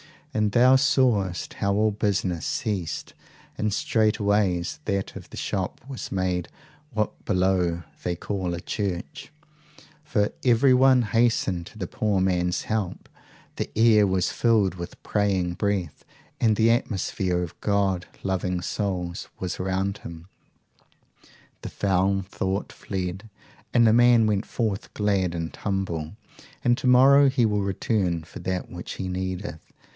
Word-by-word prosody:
And 105 -2 +1
thou 130 +2 +6
sawest 120 - +1
how 100 0 0
all 110 +1 +3
business 100 -5 -1
ceased, 95 -7 -3 0.4
and 105 0 0
straightway 105 -4 +1 0.2
that 100 -2 -2
of - - -10
the - - -10
shop 95 -2 -3
was 135 -3 -6
made 90 -2 -1 0.4
what 110 -2 -2
below 90 -3 +1 0.2
they 90 - -2
call 95 -1 -3
a 85 - -6
church; 100 +5 -4 0.7
for 105 -7 +1
everyone 130 +1 +5
hastened 105 -6 +1
to - - -14
the - - -3
poor 105 -3 0
man's 90 -1 +1
help, 110 -5 -3 0.5
the - - -2
air 110 -2 +5
was 95 -1 +1
filled 110 -6 +2
with 85 -1 -9
praying 95 -4 0
breath, 95 -5 -2 0.4
and 110 -2 +3
the 110 +2 +4
atmosphere 95 -5 0
of 85 - -8
God 100 -3 +1 0.2
loving 90 -1 -1
souls 90 -2 -3
was 90 -1 -4
around 95 +2 -1
him; 85 +1 -10 1.3
the - - -6
foul 95 0 +1
thought 95 +1 -3
fled, 95 +2 -5 0.4
and 120 - +5
the 110 - +5
man 120 -1 +6
went 105 -1 0
forth 110 -5 -2
glad 100 -4 +1
and 80 -1 -4
humble, 95 -5 -3 0.5
and 120 0 +4
to - - -1
morrow 135 +3 +7
he 130 -3 +2
will 105 -2 +1
return 95 -3 0
for 80 - -11
that 95 -1 -3
which 90 0 -7
he 95 - -4
needeth. 95 -1 -4
100 Hz, 140 wpm, -25 LUFS, 90-110 Hz, 1.3 s, morrow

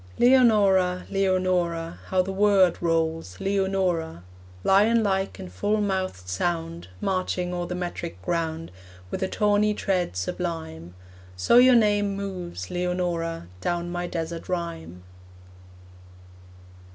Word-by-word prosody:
Leonora, 205 -8 +4
Leonora, 185 -3 0
How 185 -1 +2
the 195 - -4
word 195 -2 +4
rolls 165 - -1
Leonora. 190 - -1 0.4
Lion 220 +4 +4
like 195 -1 -1
in 190 - -7
full 210 +3 -1
mouthed 190 - -2
sound, 95 - -2
Marching 185 - -1
o'er 175 -1 -3
the 180 - -4
metric 175 - -5
ground, 165 - -2 0.4
With - - -4
a 190 - +1
tawny 210 +1 +2
tread 185 - -1
sublime. 90 - -4 0.4
So 90 - +3
your 250 0 +7
name 205 -3 +2
moves, 180 - -6
Leonora, 175 - -2
Down 175 - -2
my 175 0 -3
desert 165 0 -5
rhyme. 90 - -5
180 Hz, 115 wpm, -25 LUFS, 165-195 Hz, 0.4 s, your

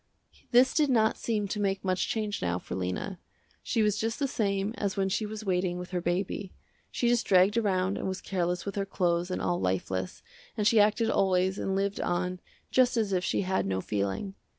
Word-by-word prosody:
This 255 +1 +5
did 300 -2 +3
not 220 -4 +3
seem 210 -3 -1
to 210 - -2
make 195 -1 -1
much 185 0 +1
change 215 -2 -2
now 85 0 0
for - - -8
Lena. 95 - -3 0.4
She 225 -3 0
was 210 -1 +1
just 225 +1 -1
the 280 - 0
same 200 -3 -1
as 200 -1 -2
when 195 -1 +1
she 210 +3 -1
was 215 0 -7
waiting 180 -1 0
with 180 +1 -7
her 180 -1 -1
baby. 185 +2 -2 0.3
She 240 - -1
just 240 -1 +2
dragged 190 +2 +5
around 195 -4 +1
and - - -3
was 190 0 -3
careless 180 -2 -2
with 200 - -3
her 195 - 0
clothes 175 -2 0
and 185 - -3
all 175 - 0
lifeless, 95 0 -2 0.3
and 210 - 0
she 215 +1 +5
acted 215 +2 +3
always 190 0 +2
and 190 - -1
lived 200 +1 -1
on 180 +1 -1 0.3
just 250 -1 +3
as 210 -3 +1
if 180 -1 +1
she - - 0
had 190 - 0
no 95 -1 0
feeling. 100 - -2
195 Hz, 210 wpm, -29 LUFS, 180-210 Hz, 0.4 s, This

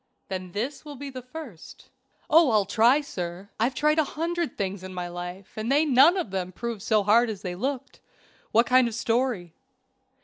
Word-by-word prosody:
"Then 185 -2 -5
this 250 +8 -3
will 295 -2 -9
be 280 +1 -7
the 255 -1 -7
first." 255 - -11 0.4
"Oh, 320 -1 +6
I'll 215 -3 +3
try, 230 +8 +4
sir. 180 -6 -6
I've 245 +4 +1
tried 305 +1 +2
a - - +5
hundred 335 +3 -3
things 195 -1 -3
in 185 0 -8
my 180 -1 -3
life 175 +2 -8
and 220 +3 -2
they 295 +3 +4
none 290 +6 +6
of 345 - -3
them 185 -1 -3
proved 230 +2 -5
so 215 0 +2
hard 225 +4 +4
as 210 -2 -6
they 180 -2 -3
looked. 260 +8 -4 0.5
What 230 +2 +4
kind 255 -1 +4
of 230 - -5
story?" 230 -7 -1
230 Hz, 195 wpm, -26 LUFS, 190-275 Hz, 0.5 s, Oh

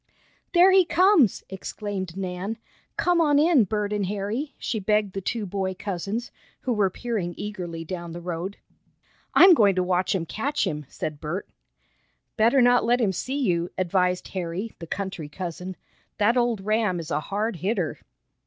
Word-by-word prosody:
"There 360 +2 +7
he 380 0 +7
comes!" 360 - +4
exclaimed 190 -1 -5
Nan. 190 +3 -3 0.4
"Come 350 -1 +3
on 295 -3 +4
in, 300 -6 +5
Bert 210 +1 -2
and 205 -2 0
Harry," 210 +9 -3
she 220 - -2
begged 210 0 +1
the 195 - -3
two 220 +3 -2
boy 190 0 -2
cousins, 200 +5 -4 0.3
who 250 - 0
were 205 -3 +2
peering 195 -4 -3
eagerly 175 -6 -5
down 170 0 -5
the 170 - -6
road. 175 +3 -4 0.8
"I'm 370 0 +9
going 205 - +4
to 185 - +2
watch 180 +1 +1
'em 170 -3 -1
catch 275 - -1
him," 150 -6 -4
said 150 -1 -5
Bert. 170 +5 -4 0.9
"Better 235 +4 +4
not 245 0 +5
let 240 +2 +3
him 215 -5 +2
see 260 +9 -3
you," 175 -10 +1
advised 180 0 +1
Harry, 185 +4 -4
the 165 - -8
country 185 -5 -4
cousin. 180 +2 -6 0.4
"That 215 +4 +3
old 240 -4 +1
ram 215 -3 +1
is 165 0 -7
a - - +1
hard 200 +6 -2
hitter." 200 +8 -1
200 Hz, 165 wpm, -25 LUFS, 180-230 Hz, 0.9 s, I'm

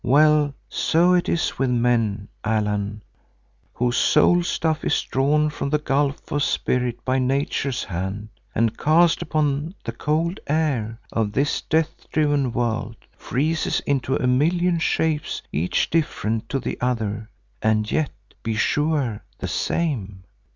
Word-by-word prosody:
Well, 145 +2 +4
so 175 +3 +3
it 180 0 +2
is 170 - 0
with 135 -1 +2
men, 115 -4 +1 0.2
Allan, 105 -1 -1 0.7
whose 120 0 0
soul 175 +3 +4
stuff 160 -2 -1
is - - +2
drawn 150 +3 +1
from 140 - -3
the 150 - +2
gulf 140 -1 -1
of 145 - 0
Spirit 125 -3 0
by 130 0 +1
Nature's 135 0 0
hand, 95 +4 -4 0.3
and, 115 0 +2
cast 165 +2 +4
upon 150 +2 -1
the 115 - -3
cold 155 +8 -1
air 135 -8 0
of 110 -2 -1
this 140 +4 +1
death 160 0 -1
driven 145 -4 +2
world, 115 -1 -1 0.2
freezes 155 +5 0
into 135 -1 0
a - - -1
million 170 +7 +2
shapes 160 -2 0
each 85 +5 0
different 115 -8 -1
to 140 - 0
the - - -5
other 110 -3 -1 0.3
and 110 0 +1
yet, 155 -3 +1 0.3
be 115 -1 -2
sure, 145 -2 0
the - - -4
same. 105 - -2
135 Hz, 135 wpm, -23 LUFS, 115-155 Hz, 0.7 s, Well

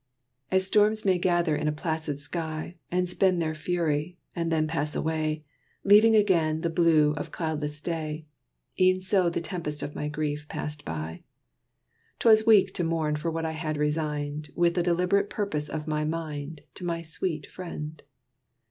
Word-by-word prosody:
As 190 0 +3
storms 210 +2 +3
may 185 -2 +3
gather 175 -3 +2
in 150 +1 -1
a - - +3
placid 155 -1 -3
sky, 160 +2 -5
And 180 0 +1
spend 180 0 +2
their 160 -1 0
fury, 160 0 -1 0.2
and 170 -1 -1
then 155 -1 +2
pass 150 -1 -2
away, 155 -1 -1 0.4
Leaving 215 +3 +7
again 165 -7 +3
the 170 - -1
blue 160 -3 +4
of - - -4
cloudless 150 -3 -3
day, 155 -2 -4 0.5
E'en 185 0 +5
so 185 -1 +2
the 170 - -2
tempest 165 -4 -4
of 145 - -5
my 150 - -3
grief 150 0 -3
passed 150 0 -5
by. 80 0 -4 1.0
'T - - 0
was 220 0 +6
weak 215 -4 +6
to 175 - 0
mourn 160 -2 0
for 150 +3 -2
what 165 0 -2
I 160 - -1
had 155 -1 -3
resigned, 150 0 -2
With 170 -1 +3
the 175 - +1
deliberate 180 +3 +2
purpose 155 -8 -2
of 155 -1 -4
my 150 -1 0
mind, 155 -1 -4
To - - -8
my 170 -1 -2
sweet 160 -2 -3
friend. 160 -4 -7
160 Hz, 170 wpm, -27 LUFS, 150-180 Hz, 1.0 s, Leaving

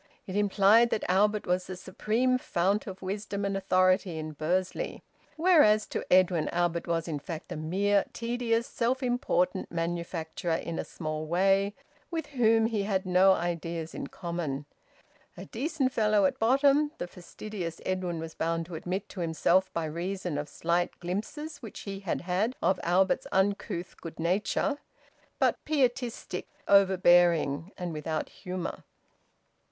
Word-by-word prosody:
It 185 - -6
implied 205 +3 +5
that 215 - -1
Albert 210 +3 +2
was 180 0 0
the 185 - -5
supreme 225 +7 0
fount 195 +1 0
of 190 -1 -8
wisdom 200 +1 -3
and 195 0 -1
authority 185 -2 +2
in 155 0 -4
Bursley. 175 +5 -2 0.3
Whereas 300 - +5
to - - -3
Edwin, 180 -3 +4
Albert 170 -1 0
was 165 -1 -1
in 155 -3 -3
fact 160 +2 -7
a - - -3
mere 195 +6 +1
tedious, 235 -1 -1
self 250 +3 -1
important 245 -7 0
manufacturer 170 0 -2
in 165 0 -4
a - - -1
small 155 -1 -5
way, 195 +4 +2 0.3
with 330 -1 -3
whom 225 -3 +4
he 225 -2 0
had 195 -1 -1
no 185 +1 +5
ideas 170 -2 -3
in - - -5
common. 165 -5 -4 0.7
"A - - -7
decent 295 -3 -1
fellow 210 -2 +3
at - - 0
bottom," 275 +5 +4
the - - -3
fastidious 180 0 -7
Edwin 185 -2 -1
was 160 0 -6
bound 165 0 -1
to 175 - -11
admit 180 +5 -3
to 195 - -9
himself 175 +3 +2
by 165 -1 -2
reason 175 +2 -3
of 145 0 -5
slight 170 +3 -1
glimpses 220 - -4
which 225 -5 -9
he 195 -1 -6
had 195 -3 -2
had 190 +8 0
of 185 -1 +1
Albert's 185 +3 +2
uncouth 190 -2 -1
good 165 -1 -8
nature; 205 - 0 0.6
but - - +1
pietistic, 250 -9 -1 0.2
overbearing, 175 -5 +4
and 180 -2 -4
without 155 0 -3
humour. 180 -2 -6
185 Hz, 145 wpm, -29 LUFS, 170-210 Hz, 0.7 s, implied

